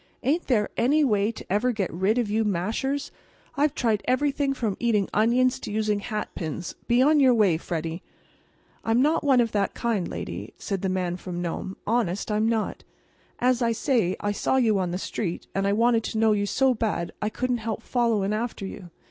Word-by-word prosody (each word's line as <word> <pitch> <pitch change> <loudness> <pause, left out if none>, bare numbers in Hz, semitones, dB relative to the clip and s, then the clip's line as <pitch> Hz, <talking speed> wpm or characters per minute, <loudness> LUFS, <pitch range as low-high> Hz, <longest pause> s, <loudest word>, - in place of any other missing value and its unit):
"Ain't 300 +7 +1
there 215 -6 +1
any 290 +6 +3
way 210 -4 +2
to 230 - -10
ever 210 +7 +1
get 205 -5 -2
rid 190 +7 +1
of 240 -3 +1
you 215 +2 +1
mashers? 220 +9 -1 0.4
I've 295 0 +1
tried 220 -4 +1
everything 280 +2 +1
from 220 -6 -1
eating 215 -5 +2
onions 250 +4 +3
to - - -6
using 210 -1 0
hatpins. 180 -6 -4
Be 240 +2 +4
on 300 +2 +5
your 260 -3 +5
way, 200 -7 +3
Freddie." 165 0 -4 0.8
"I'm 225 +1 +2
not 310 +3 +2
one 270 -3 +4
of 230 -2 +2
that 200 -2 0
kind, 225 -7 -1
lady," - - -6
said 195 -3 -3
the 190 - 0
Man 180 -1 -1
from 180 -1 -6
Nome—"honest, 190 +4 -2
I'm 215 +1 +2
not. 225 -2 -2 0.5
As 250 0 +2
I 230 -1 +2
say, 225 -7 +1
I 205 - -1
saw 205 - 0
you 225 -6 +3
on 180 -2 -1
the 175 - -2
street, 185 -2 -4
and 195 0 0
I 200 - +2
wanted 230 +1 +3
to - - -3
know 220 0 +4
you 205 -1 +1
so 265 +4 +3
bad 215 -7 -2
I 210 - 0
couldn't 250 +2 -1
help 225 0 -4
followin' 225 -5 +1
after 220 -2 -3
you. 190 -2 -8
220 Hz, 195 wpm, -25 LUFS, 195-245 Hz, 0.8 s, on